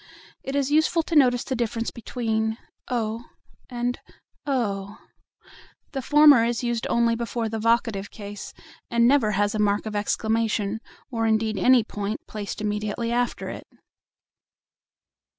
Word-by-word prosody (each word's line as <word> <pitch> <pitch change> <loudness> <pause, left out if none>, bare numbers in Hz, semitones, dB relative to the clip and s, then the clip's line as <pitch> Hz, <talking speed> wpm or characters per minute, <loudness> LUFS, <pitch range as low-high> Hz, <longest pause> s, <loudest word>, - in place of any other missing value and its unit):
It 270 - -5
is 280 0 0
useful 315 +2 +3
to 330 - -4
notice 250 -4 +5
the 260 - -3
difference 230 -1 -2
between 220 -2 -2 0.3
"O" 230 -1 -2 0.4
and 245 0 -2 0.5
"Oh." 205 -6 -1 0.9
The 270 - -3
former 290 -2 +7
is 235 +1 -1
used 235 -1 -1
only 235 -1 +2
before 230 -1 -2
the 220 0 -3
vocative 230 -3 +1
case, 205 -2 -8 0.4
and 235 0 +4
never 245 -6 +3
has 205 +2 +1
a 215 - -2
mark 205 0 +1
of 215 -1 -5
exclamation, 220 0 0 0.3
or 225 -2 0
indeed 220 -1 +1
any 255 -2 +5
point, 210 0 -5
placed 210 -1 -6
immediately 210 +2 -2
after 245 0 -1
it. - - -8
230 Hz, 135 wpm, -25 LUFS, 215-245 Hz, 0.9 s, former